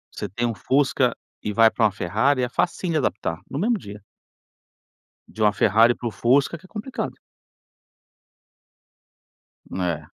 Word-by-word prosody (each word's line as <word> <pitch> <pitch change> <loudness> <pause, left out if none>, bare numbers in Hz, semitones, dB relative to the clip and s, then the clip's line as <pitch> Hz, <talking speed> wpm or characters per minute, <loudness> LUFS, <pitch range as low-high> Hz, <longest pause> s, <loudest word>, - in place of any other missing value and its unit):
Você 105 - -4
tem 120 +5 -2
uma 115 - 0
Fusca 130 +3 +1 0.3
e 105 - -3
vai 110 +1 +5
para 115 - +2
uma 105 - +3
Ferrari 125 +9 +1
é 120 - -1
facinho 175 +3 -1
de - - +2
adaptar 85 - -2
no 140 - -5
mesmo 225 +3 +1
dia. 100 -3 -10 1.3
De 110 - -8
uma 105 -1 +4
Ferrari 115 +4 +4
para 120 - -5
o - - -3
Fusca 135 +9 +2
que 170 - -19
é - - -14
complicado. 230 +5 -5 2.6
É. 90 -4 -2
120 Hz, 155 wpm, -23 LUFS, 105-140 Hz, 2.6 s, vai